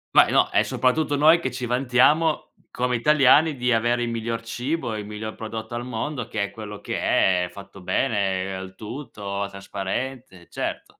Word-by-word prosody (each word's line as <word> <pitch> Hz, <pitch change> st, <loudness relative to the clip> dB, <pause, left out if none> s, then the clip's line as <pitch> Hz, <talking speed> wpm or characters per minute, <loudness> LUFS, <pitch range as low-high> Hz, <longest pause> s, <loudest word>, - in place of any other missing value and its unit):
Beh -, -, +7 dB
no, -, -, +4 dB
è -, -, +4 dB
soprattutto 145 Hz, +3 st, +1 dB
noi 160 Hz, +4 st, +6 dB
che 130 Hz, -, -2 dB
ci 125 Hz, 0 st, -5 dB
vantiamo 130 Hz, +6 st, +2 dB, 0.2 s
come 125 Hz, 0 st, -1 dB
italiani 150 Hz, +3 st, +5 dB
di 125 Hz, -2 st, +1 dB
avere 120 Hz, +1 st, +1 dB
il 120 Hz, -, -2 dB
miglior 115 Hz, 0 st, -3 dB
cibo, 120 Hz, +2 st, -3 dB
il 105 Hz, -1 st, -5 dB
miglior 105 Hz, +1 st, -6 dB
prodotto 110 Hz, +1 st, -6 dB
al 120 Hz, +1 st, -3 dB
mondo, 125 Hz, +1 st, -4 dB
che 105 Hz, -, -2 dB
è 100 Hz, -, -4 dB
quello 105 Hz, -2 st, -8 dB
che -, -, -3 dB, 0.5 s
è -, -, -8 dB
fatto 100 Hz, 0 st, -12 dB
bene, 95 Hz, -3 st, 0 dB
al 95 Hz, 0 st, -8 dB
tutto, 100 Hz, -4 st, -5 dB
trasparente, 100 Hz, +1 st, -5 dB
certo. -, -, -5 dB
115 Hz, 170 wpm, -24 LUFS, 105-130 Hz, 0.5 s, Beh